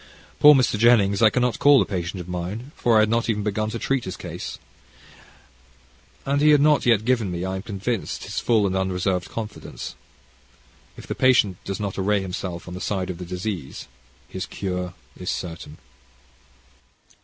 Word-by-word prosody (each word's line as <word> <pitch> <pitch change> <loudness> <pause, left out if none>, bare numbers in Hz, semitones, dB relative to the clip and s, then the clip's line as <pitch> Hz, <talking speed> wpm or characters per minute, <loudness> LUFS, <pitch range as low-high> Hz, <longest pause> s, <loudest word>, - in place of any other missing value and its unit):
Poor 150 0 +9
Mr. 125 -5 +2
Jennings 105 -4 +4
I 110 - +7
cannot 125 +1 0
call 145 -1 +6
a - - +2
patient 90 0 -4
of 90 - -10
mine, 90 +9 -5
for 115 -2 +3
I - - +6
had 110 - +2
not 115 +1 0
even 105 -2 0
begun 110 +1 -1
to 115 - -4
treat 135 +1 -1
his 95 - -5
case, - - -7 1.7
and 140 +1 +1
he 150 - +5
had 150 -1 +6
not 150 -2 +3
yet 110 -3 +3
given 120 -5 +1
me, 90 0 -3
I 95 0 -3
am - - -5
convinced, 105 +1 -3
his - - -4
full 110 -4 +2
and 95 -1 -1
unreserved 95 -1 -1
confidence. 110 -2 -7 1.0
If - - -10
the - - -3
patient 125 -8 +3
do 100 - -3
not 100 -2 -3
array 100 +2 +2
himself 90 -2 -5
on 90 - -7
the 90 - -7
side 95 -2 -2
of 90 - -9
the 90 - -6
disease, 90 -4 -5 0.4
his 95 - -6
cure 90 -2 -4 0.2
is - - -4
certain. 80 -3 -5
100 Hz, 180 wpm, -23 LUFS, 90-115 Hz, 1.7 s, Poor